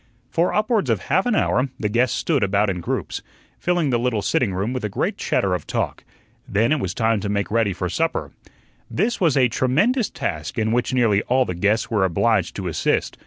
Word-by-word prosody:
For 170 +4 +2
upwards 210 - +1
of 110 -4 +2
half 190 +7 +3
an 240 - +2
hour 130 -7 +1
the 105 - 0
guests 120 +4 +1
stood 150 -6 0
about 100 +1 +2
in 90 -2 -4
groups, - - -3 0.4
filling 175 -5 +1
the 120 - +2
little 115 -4 0
sitting 120 -6 +1
room 100 +6 -2
with 130 -2 -4
a 105 - -1
great - - -1
chatter - - 0
of - - -3
talk. - - -2 0.5
Then 110 +5 +2
it 155 - +2
was 95 -5 -3
time 115 -2 +1
to 100 +1 -3
make 100 0 -1
ready 115 -2 +2
for 90 0 -3
supper. 165 - -1 0.6
This 220 +6 -1
was 160 -6 +3
a 130 -2 +5
tremendous 185 - +1
task, 80 -1 -4
in 110 -1 +1
which 120 +2 0
nearly 115 -6 +3
all 130 +1 +3
the 90 - -3
guests 100 +7 0
were 105 -4 +2
obliged 90 -3 +1
to - - -4
assist. - - -1
115 Hz, 215 wpm, -22 LUFS, 100-145 Hz, 0.6 s, a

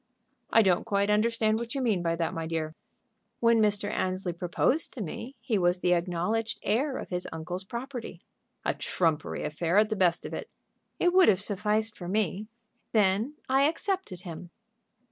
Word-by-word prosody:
"I 225 - +6
don't 180 -3 +3
quite 200 0 +1
understand 220 0 +2
what 235 +3 -5
you 270 - -1
mean 215 -7 +1
by 165 -1 0
that, 165 -1 -1
my 165 -1 -3
dear." 160 -1 -2 0.7
"When 230 -1 +4
Mr. 205 -1 +3
Annesley 185 -2 -2
proposed 175 - +1
to 245 - -5
me 235 - -7
he 225 -3 0
was 175 0 +3
the 180 - +3
acknowledged 180 +6 -1
heir 265 +4 +1
to - - -5
his 180 0 -3
uncle's 175 +3 -5
property." 240 +4 -7 0.4
"A - - +2
trumpery 160 -4 -1
affair 170 +4 0
at 215 0 +5
the 215 - 0
best 180 -4 +2
of - - -6
it." - - -5 0.5
"It 355 0 +3
would 370 -1 +7
have 190 - +4
sufficed 210 +2 0
for 175 - -8
me. 205 +1 -1 0.5
Then 215 +6 +2
I 270 +2 +4
accepted 335 - -2
him." 175 -1 -8
205 Hz, 175 wpm, -28 LUFS, 175-230 Hz, 0.7 s, would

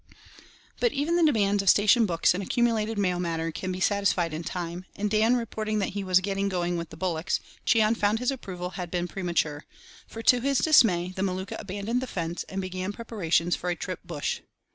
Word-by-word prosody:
But 480 -2 +2
even 300 +5 0
the 345 - +3
demands 205 -9 +3
of 195 - +2
station 215 +2 +5
books 170 -1 +3
and 185 - -3
accumulated 225 +1 0
mail 180 -3 +1
matter 165 -2 -2
can 185 +3 -4
be 185 - -4
satisfied 190 -4 +1
in 160 +2 -4
time, 175 +1 -5
and 205 0 -2
Dan 220 +3 +4
reporting 215 -2 -2
that 200 - 0
he 200 -1 -3
was 185 -1 +3
"getting 195 +1 -1
going 175 -2 -1
with 170 -1 -4
the 160 - -11
bullocks," 175 0 -1 0.3
Cheon 220 +1 +4
found 210 0 +1
his 250 +3 0
approval 185 -8 -6
had 180 -2 -5
been 175 0 -2
premature; 170 -6 -2 0.4
for, 225 - -8
to 245 +1 +5
his 275 +1 +1
dismay, 195 - +4
the 190 - -3
Maluka 190 0 -2
abandoned 205 +5 -2
the 260 - -4
fence, 170 -4 -3
and 190 - -4
began 185 +1 -4
preparations 180 -6 0
for 180 - -4
a 175 - 0
trip - - -5
"bush." - - -3
195 Hz, 205 wpm, -27 LUFS, 175-220 Hz, 0.4 s, station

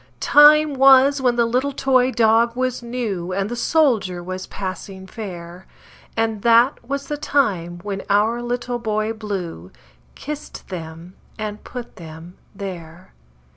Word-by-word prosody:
Time 300 0 +6
was 270 +1 +5
when 250 -2 +2
the 235 -1 +2
little 255 +4 0
toy 260 -2 +2
dog 230 0 +3
was 255 -1 -2
new, 225 -7 -4
And 195 +2 -2
the - - -2
soldier 230 - +1
was 185 +1 -6
passing 190 0 -7
fair; 180 -3 -9 0.5
And 225 -2 -1
that 235 +4 +4
was 275 +3 -4
the 295 +1 -4
time 195 - 0
when 200 -1 -4
our 215 +4 +2
Little 245 0 -3
Boy 215 -1 -1
Blue 190 - -6 0.5
Kissed 300 +1 -8
them 165 0 -8 0.2
and 210 -1 -6
put 245 -2 -9
them 165 +1 -11 0.2
there. 180 -3 -9
220 Hz, 135 wpm, -21 LUFS, 185-255 Hz, 0.5 s, Time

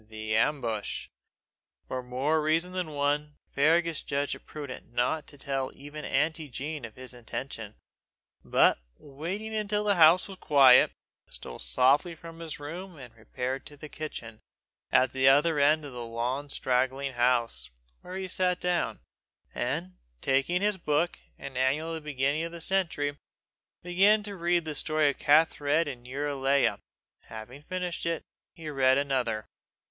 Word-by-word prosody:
THE 110 0 -3
AMBUSH. 115 -4 -1 0.8
For 130 - -3
more 135 +6 0
reasons 165 +4 +1
than 175 -5 -3
one, 145 +1 0 0.2
Fergus 165 +2 +3
judged 140 +1 -1
it - - -11
prudent 140 -5 -8 0.3
to 145 - -15
tell 135 -1 -2
not - - -14
even 145 +2 -8
auntie 155 +1 0
Jean 145 +1 -5
of 110 - -11
his 130 0 -9
intention; 115 -2 -6 0.7
but, - - +4 0.2
waiting 175 +10 -6
until 210 -1 0
the 205 -1 +3
house 170 0 +6
was 190 -2 -10
quiet, 135 -4 +7 0.4
stole - - -5
softly 135 - +3
from 165 0 -11
his 165 -3 -6
room 170 +4 -7
and 125 -4 -11
repaired 125 +4 -4
to 145 - -12
the 155 +1 -9
kitchen 115 -9 -7 0.5
at 130 0 +4
the 130 0 +3
other 145 +3 +5
end 150 +2 +4
of 140 - -7
the 120 -1 -5
long 120 +5 -2
straggling 130 +1 0
house, 120 - +1 0.3
where 180 - -8
he 190 0 -3
sat 180 -1 +1
down, 175 -11 -1 0.5
and - - -3 0.2
taking 135 - +1
his 210 -1 +2
book, 155 +2 0 0.2
an 135 - -8
annual 135 +5 +1
of - - -3
the 160 - -4
beginning 140 +3 +1
of 165 - -4
the 170 - -8
century, 165 -7 0 0.7
began 195 +5 +4
to 205 -1 -6
read 175 -1 +1
the 155 - -3
story 155 0 +2
of - - -14
Kathed 150 +1 +3
and 125 -3 -7
Eurelia. 140 0 +1 0.5
Having 115 +5 -9
finished 180 +1 -4
it, 165 -1 -1 0.3
he 165 -3 -9
read 135 -2 +3
another. 125 -6 0
145 Hz, 155 wpm, -28 LUFS, 130-165 Hz, 0.8 s, quiet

